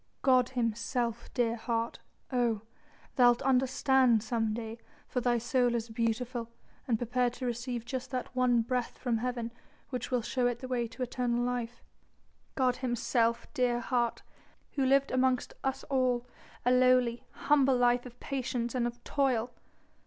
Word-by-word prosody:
God 255 -2 +4
himself, 235 0 -1
dear 235 -2 +2
heart! 230 0 -2 0.3
oh! 240 -4 +1 0.6
thou'lt 245 0 +5
understand 260 -2 +3
some 225 -1 0
day 225 +1 -5 0.3
for 250 - -2
thy 240 0 +2
soul 240 +1 +1
is 230 0 -2
beautiful 230 +1 -2 0.4
and 235 -3 +2
prepared 245 +1 0
to 255 - -6
receive 240 0 -3
just 255 +1 -4
that 255 -1 -4
one 245 -2 +3
breath 250 +1 -2
from 240 -3 -1
Heaven 240 -1 -3 0.4
which 250 -3 -3
will 250 -3 0
show 250 +1 +1
it 245 -1 -1
the 255 +1 -7
way 245 -2 -1
to 245 +3 -5
eternal 245 -1 -1
life 245 -1 -3 0.7
God 255 -2 +2
Himself, 235 -2 0
dear 245 -1 +1
heart, 240 -1 -1 0.5
who 275 - -1
lived 275 +1 +3
amongst 255 -1 +1
us 270 0 -1
all 255 -3 +1 0.4
a 250 - +4
lowly, 250 -1 +4
humble 275 -3 +3
life 245 0 +3
of 245 0 -15
patience 245 -3 -2
and 245 -2 +1
of 240 0 -8
toil! 255 -4 0
245 Hz, 150 wpm, -31 LUFS, 235-255 Hz, 0.7 s, thou'lt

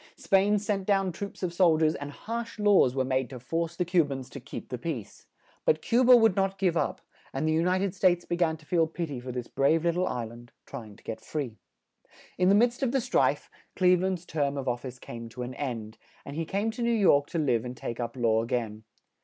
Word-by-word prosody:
Spain 200 +2 +3
sent 205 -2 -2
down 195 -2 +2
troops 200 +3 -7
of 175 -2 -1
sol 175 -3 +4
diers; 155 0 +3
and 145 0 -5
harsh 230 +10 -6
laws 205 - +4
were 130 -1 +1
made 130 -1 0
to 130 -2 -8
force 165 +6 -2
the 180 - -1
Cu 175 -1 +4
bans 135 -3 -6
to 140 - -7
keep 135 - -8
the 125 - -3
peace. 125 -9 -6 0.4
But 155 - +1
Cu 240 +2 +4
ba 250 0 +8
would 225 -5 +4
not 195 0 0
give 185 -3 +1
up; - - -1 0.3
and 135 +4 -1
the - - +2
U 160 +1 +2
ni 180 +1 +2
ted 190 -1 -1
States 180 -2 +2
be 175 - -1
gan 165 -2 +1
to 155 - -20
feel 165 0 +2
pit 165 -1 -4
y 130 - -4
for 125 +1 -6
this 125 -1 -5
brave 155 +4 +2
lit 170 - +3
tle 180 +2 0
is - - -1
land, 120 0 -6
try 110 - -8
ing 105 - -14
to - - -21
get 110 0 -6
free. 130 -7 -4 0.8
In 180 0 +4
the 200 - +6
midst 240 +4 +3
of 260 -3 +1
the 270 - +3
strife, 235 - +1 0.2
Cleve 180 -1 +4
land's 185 -2 -1
term 145 -3 -1
of 135 -1 -4
of 120 -1 -1
fice 130 -1 -7
came 115 -1 -8
to 125 +2 -6
an 125 +1 -6
end, 115 -6 -5 0.3
and 140 - -7
he 165 +1 -2
came 205 +6 -1
to 220 - -7
New 235 - +1
York 180 -11 +4
to - - -4
live 125 -8 +1
and 125 0 -7
take 115 - -5
up 120 0 -3
law 115 -2 +2
a 115 - -4
gain. 110 -3 -2
160 Hz, 255 wpm, -28 LUFS, 125-190 Hz, 0.8 s, ba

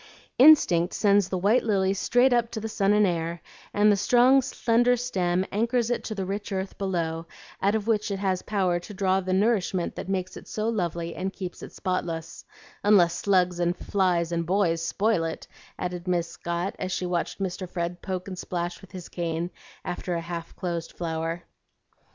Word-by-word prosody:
"Instinct 195 - +6
sends 200 -3 +3
the 185 - -1
white 205 +7 +3
lily 195 -3 +2
straight 245 +6 +3
up 235 -1 +2
to 225 - -5
the 220 - -4
sun 200 -2 +1
and 210 0 +5
air, 170 -1 -1 0.3
and 210 +1 +4
the - - +4
strong 250 +6 +5
slender 245 0 +2
stem 185 -7 0
anchors 235 +2 +1
it 240 - -1
to 215 - -4
the 195 -2 -3
rich 205 +3 -4
earth 190 0 -3
below, 165 -4 -2 0.3
out 200 +2 +2
of 215 -2 -1
which 215 -2 +1
it 200 - -2
has 190 -2 0
power 185 -4 0
to 195 +4 -10
draw 190 -1 +2
the 185 -1 -3
nourishment 190 -3 +1
that - - -7
makes 185 -1 -2
it - - -11
so 215 0 -2
lovely 170 -6 -2
and 190 +1 -3
keeps 185 -3 -7
it - - -8
spotless 170 -4 -3 0.4
unless 190 -5 +5
slugs 180 -1 +1
and 175 +1 +1
flies 180 -4 +1
and 170 -1 -1
boys 175 -3 +2
spoil 205 0 +1
it," 165 0 -5 0.3
added 180 0 -4
Miss 175 -2 +1
Scott 170 +3 -3
as 185 - -3
she 185 - -2
watched 175 -1 -2
Mr. 185 -1 -4
Fred 175 0 -3
poke 185 -1 -4
and 185 -2 -6
splash 175 -1 -4
with 195 - -15
his 180 -2 -7
cane 170 0 -3 0.3
after 175 0 -3
a 170 - -2
half 170 0 -6
closed 170 -3 -4
flower. 165 0 -3
185 Hz, 190 wpm, -26 LUFS, 175-205 Hz, 0.4 s, Instinct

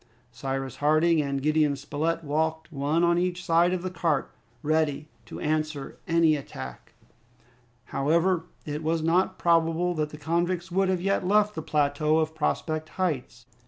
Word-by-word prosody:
Cyrus 135 +1 -4
Harding 155 +2 +3
and 140 -1 -2
Gideon 155 -1 +2
Spilett 150 +4 -2
walked 160 +2 -1
one 145 +4 +1
on 170 0 +3
each 180 0 -2
side 170 +2 +4
of 180 -1 -2
the 185 - -3
cart, 165 -5 0 0.3
ready 155 -1 0 0.2
to - - -8
answer 155 -2 -2
to - - -22
any 165 -2 +4
attack. 65 - -8 0.9
However, 165 +5 +1 0.2
it 150 0 -4
was 160 0 0
not 170 +3 +2
probable 170 +1 +2
that 155 -2 -1
the 150 - -10
convicts 175 +4 -1
would 190 +1 +2
have 185 -2 0
yet 195 +1 +1
left 210 +1 +3
the 160 - -4
plateau 150 +1 +1
of 160 0 0
Prospect 155 0 -2
Heights. 135 -9 -2
160 Hz, 160 wpm, -27 LUFS, 150-170 Hz, 0.9 s, side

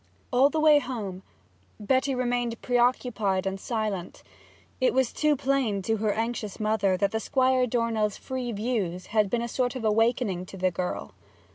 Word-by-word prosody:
All 260 +3 +5
the 315 - -1
way 305 -1 +6
home 210 -9 -5 0.6
Betty 260 +5 +1
remained 245 -2 -1
preoccupied 240 -6 +1
and 195 0 -2
silent. 210 -5 -3 0.6
It 255 -1 +2
was 260 -2 +2
too 305 -1 +2
plain 260 -7 0
to 220 +3 0
her 215 0 0
anxious 225 -2 -3
mother 210 -3 +1
that 200 +4 0
Squire 255 0 +2
Dornell's 225 -3 0
free 255 -2 -4
views 205 -5 -2
had 210 -3 +3
been 235 +2 0
a - - -2
sort 245 +1 -1
of 245 -3 -4
awakening 215 -4 +1
to 195 - -10
the 185 0 +1
girl. 175 - -4
225 Hz, 160 wpm, -27 LUFS, 200-255 Hz, 0.6 s, way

